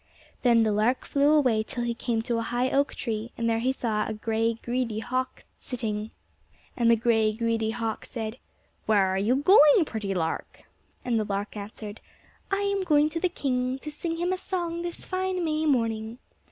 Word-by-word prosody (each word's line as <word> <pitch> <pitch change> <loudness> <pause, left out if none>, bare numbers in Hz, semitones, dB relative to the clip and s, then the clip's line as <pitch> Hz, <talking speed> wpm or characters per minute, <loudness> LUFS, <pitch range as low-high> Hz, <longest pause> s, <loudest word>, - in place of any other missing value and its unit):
Then 235 -2 +5
the 215 - +2
lark 215 +5 +1
flew 285 +1 +2
away 255 -8 +4
till 240 +2 -4
he 240 0 -1
came 230 -1 -2
to 235 -1 -1
a - - -1
high 245 +3 -1
oak 280 +1 +1
tree, 225 -1 -3
and 230 - -1
there 225 0 +2
he 255 +3 +1
saw 220 -5 -1
a - - -3
gray, 225 +1 0
greedy 240 -1 -2
hawk 255 +3 -3 0.2
sitting. 220 -4 -3 0.7
And 235 -2 +3
the 235 - +7
gray, 225 -1 +2
greedy 225 0 0
hawk 225 -1 -3
said, 225 0 -5 0.5
"Where 205 -3 +4
are 190 0 0
you 220 +6 +2
going, 300 +2 +6
pretty 210 -7 -3
lark?" 165 -2 -3 0.4
And 235 -3 +1
the - - +1
lark 205 +1 -3
answered, 210 +1 -8 0.5
"I 395 0 0
am 400 -1 0
going 305 -4 +3
to 330 - -2
the 365 - +1
king, 255 -5 -1
to 300 +3 -8
sing 330 +2 -4
him 350 +2 0
a - - -1
song 345 -3 -3
this 345 0 -5
fine 370 -1 -1
May 310 0 0
morning." 225 -4 0
235 Hz, 195 wpm, -27 LUFS, 220-290 Hz, 0.7 s, the